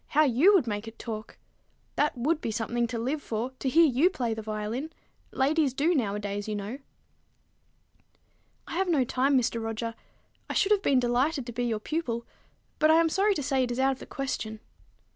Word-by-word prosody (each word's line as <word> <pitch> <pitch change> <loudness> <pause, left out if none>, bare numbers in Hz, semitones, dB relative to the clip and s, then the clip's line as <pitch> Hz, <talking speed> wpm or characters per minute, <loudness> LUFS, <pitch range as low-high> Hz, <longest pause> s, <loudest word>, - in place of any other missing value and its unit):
How 305 - +4
you 300 - +5
would 350 - +4
make 210 -1 -3
it 225 - -10
talk! 215 -2 -7 0.6
That 295 -3 +1
would 300 +6 0
be - - -2
something 235 +2 -1
to 235 0 -4
live 265 +6 -2
for, 230 +2 -3
to 265 - -1
hear 330 +5 +6
you 290 +5 +4
play 245 -11 -2
the 220 - -5
violin! 215 +7 -4 0.4
Ladies 280 0 +1
do, 310 +6 +2
nowadays, 205 -5 -2
you 215 - -2
know." 205 +6 -5 1.9
"I - - -8
have 380 0 +1
no 295 -6 +3
time, 265 +3 +2
Mr. 230 -2 0
Roger. 225 +1 -3 0.6
I - - -3
should 410 0 +2
have 415 -2 +4
been 275 -8 +3
delighted 250 +4 +1
to 240 - -6
be 245 +1 -2
your 225 -3 -1
pupil; 235 -3 -3 0.5
but 310 - +4
I 315 - +7
am 330 0 +4
sorry 395 +4 +2
to 290 - -2
say 265 0 +1
it 250 - -2
is 240 - -3
out 265 +1 +3
of 265 - -5
the - - -10
question." 220 -5 -4
255 Hz, 200 wpm, -28 LUFS, 225-305 Hz, 1.9 s, I